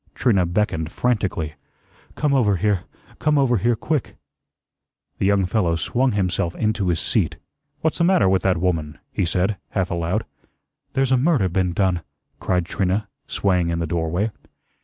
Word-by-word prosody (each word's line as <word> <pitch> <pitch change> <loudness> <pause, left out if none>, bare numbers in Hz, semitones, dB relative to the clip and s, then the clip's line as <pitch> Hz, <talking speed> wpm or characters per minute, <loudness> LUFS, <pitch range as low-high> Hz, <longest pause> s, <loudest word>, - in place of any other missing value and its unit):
Trina 100 -8 +2
beckoned 85 -4 -1
frantically. 95 -10 -1 0.6
"Come 150 -2 +1
over 110 -7 +3
here, 100 0 0 0.3
come 150 -1 +2
over 130 -4 +3
here 115 +4 +2
quick." 150 +4 -2 1.0
The 95 - +2
young 100 -1 +3
fellow 90 -3 +1
swung 120 - +1
himself 90 -3 0
into 110 -3 0
his 85 -2 +1
seat. - - 0 0.4
"What's 160 +1 0
the - - +3
matter 180 - +4
with 95 0 +3
that 95 -2 +2
woman?" 80 -4 -1
he 95 - 0
said, 95 +4 0
half 95 -3 -1
aloud. 85 +6 -1 0.7
"There's 135 -1 +1
a 130 - +5
murder 130 - +2
been 90 0 0
done," 90 -2 +1 0.4
cried 90 -2 0
Trina, 95 +4 -1 0.2
swaying 90 -3 +1
in 85 - -1
the 85 - -1
doorway. 85 +6 -1
95 Hz, 160 wpm, -22 LUFS, 85-115 Hz, 1.0 s, a